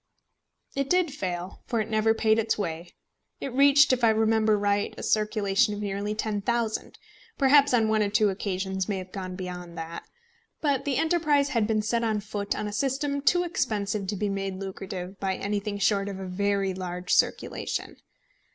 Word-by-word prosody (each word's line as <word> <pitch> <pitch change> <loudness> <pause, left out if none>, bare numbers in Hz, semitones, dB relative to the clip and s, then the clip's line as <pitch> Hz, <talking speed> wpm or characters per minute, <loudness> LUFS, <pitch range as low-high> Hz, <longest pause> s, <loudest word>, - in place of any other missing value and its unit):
It 275 0 -1
did 360 -5 +2
fail, 180 -6 -4
for 230 - 0
it 215 - -1
never 220 0 +2
paid 220 0 +3
its 225 0 0
way. 170 -3 -4 0.4
It 270 - -5
reached, 280 +1 +6
if 250 -1 -1
I 230 - +6
remember 220 -1 +3
right, 205 0 0
a - - -7
circulation 210 0 +1
of - - -6
nearly 205 +1 -3
10,000 220 +1 -2 0.4
perhaps 280 +1 +5
on 230 -3 +3
one 215 0 +2
or 205 - +1
two 210 0 +3
occasions 190 0 -3
may 200 - 0
have 185 0 -7
gone 185 -2 -5
beyond 180 -2 -7
that. 165 +1 -6 0.6
But 285 -3 0
the 280 -3 0
enterprise 305 -4 +2
had 225 -3 +1
been 215 -1 +1
set 230 +2 0
on 220 -2 +1
foot 205 0 -3
on 210 - -3
a 205 - -5
system 280 +4 -1
too 355 +5 +3
expensive 210 - -1
to 205 - -2
be 205 +2 -1
made 195 -1 -2
lucrative 190 -1 -6
by 190 -1 -1
anything 205 +1 -2
short 200 0 +1
of 195 -1 -6
a 190 - -5
very 195 +1 0
large 180 -1 -3
circulation. - - 0
210 Hz, 180 wpm, -27 LUFS, 195-235 Hz, 0.6 s, reached